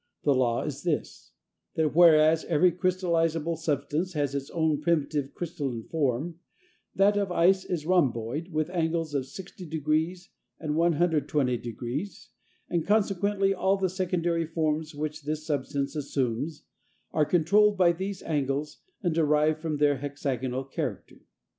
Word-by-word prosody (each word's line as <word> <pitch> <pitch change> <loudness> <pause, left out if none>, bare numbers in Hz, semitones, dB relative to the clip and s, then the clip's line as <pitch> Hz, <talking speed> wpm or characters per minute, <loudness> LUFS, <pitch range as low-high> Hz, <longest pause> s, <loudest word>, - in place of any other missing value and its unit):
The 145 - +4
law 120 -3 +1
is 145 -2 -5
this: 165 -4 -3 0.5
that 155 -2 0
whereas 160 -2 +6
every 175 +2 +4
crystallizable 170 -3 0
substance 155 +3 -2
has 145 -3 -1
its 140 -1 -3
own 160 -3 0
primitive 150 -4 0
crystalline 140 -9 -4
form, 155 +3 -2 0.6
that 200 +2 +4
of 200 -2 0
ice 185 +2 +4
is 165 -4 -3
a - - -8
rhomboid 145 -4 +1
with 155 -1 -2
angles 165 -3 -1
of 135 -2 -1
60° 160 0 -3 0.3
and 155 -2 -2
120°, 150 - 0 0.4
and 170 -2 0
consequently 200 -1 +2
all 190 +1 +1
the 190 -1 0
secondary 175 -3 -1
forms 155 -1 -1
which 150 +1 -4
this 155 +1 -4
substance 140 -1 -2
assumes 140 +1 -2 0.5
are 155 - +2
controlled 200 +6 +3
by 180 -2 +5
these 190 +3 -5
angles, 145 -1 -2 0.2
and 175 -3 +1
derive 155 -1 +2
from 160 -1 -3
them - - -1
their 145 -1 +4
hexagonal 135 -2 -3
character. 135 - -5
155 Hz, 135 wpm, -27 LUFS, 145-175 Hz, 0.6 s, whereas